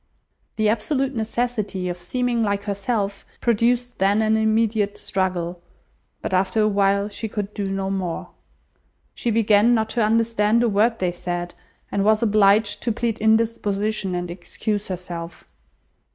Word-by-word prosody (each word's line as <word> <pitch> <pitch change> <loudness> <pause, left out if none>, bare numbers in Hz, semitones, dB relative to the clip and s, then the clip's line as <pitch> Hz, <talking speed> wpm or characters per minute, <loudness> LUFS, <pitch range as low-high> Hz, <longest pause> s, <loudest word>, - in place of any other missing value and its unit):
The 215 -1 +1
absolute 265 +5 0
necessity 220 -4 -2
of 175 0 -4
seeming 240 +6 -1
like 200 -2 0
herself 200 0 -2 0.2
produced 240 +2 +1
then 200 +3 +3
an 220 0 +3
immediate 220 -1 +1
struggle; 180 -2 -2 0.6
but - - -3
after 190 +4 +2
a 215 - +4
while 200 0 +2
she 215 +2 -5
could 210 -1 -4
do 200 -2 -3
no 195 0 -2
more. 185 -4 -3 0.8
She 240 - -2
began 225 +1 +4
not 220 -1 0
to 230 0 +1
understand 225 0 +2
a 235 - +3
word 220 +3 +2
they 180 -1 0
said, 175 0 -4 0.4
and 200 - 0
was 215 +2 +3
obliged 205 -1 +3
to 235 - 0
plead 230 0 -2
indisposition 215 -3 +1
and 175 -1 -3
excuse 205 +4 -4
herself. 175 -2 -6
210 Hz, 145 wpm, -22 LUFS, 195-225 Hz, 0.8 s, a